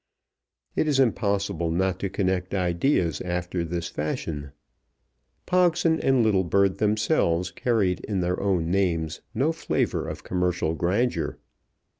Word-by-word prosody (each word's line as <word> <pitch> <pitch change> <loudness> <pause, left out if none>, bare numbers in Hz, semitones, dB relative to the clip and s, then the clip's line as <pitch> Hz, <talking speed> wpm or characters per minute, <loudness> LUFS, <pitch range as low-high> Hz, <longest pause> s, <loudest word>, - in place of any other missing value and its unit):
It - - +1
is 145 -3 +2
impossible 100 -8 +1
not 95 +3 0
to 100 - -2
connect 95 0 -1
ideas 90 - +1
after 90 0 -2
this 85 0 -3
fashion. 75 -2 -4 0.9
Pogson 175 -2 +3
and 130 -4 +3
Littlebird 95 -1 +2
themselves 105 - +1
carried 110 -8 +1
in 100 -3 -1
their 90 +1 -1
own 90 -4 0
names 85 -5 0
no 150 +5 +2
flavour 165 - -1
of - - -6
commercial 90 -3 0
grandeur. 100 +10 0
95 Hz, 120 wpm, -25 LUFS, 85-110 Hz, 0.9 s, Pogson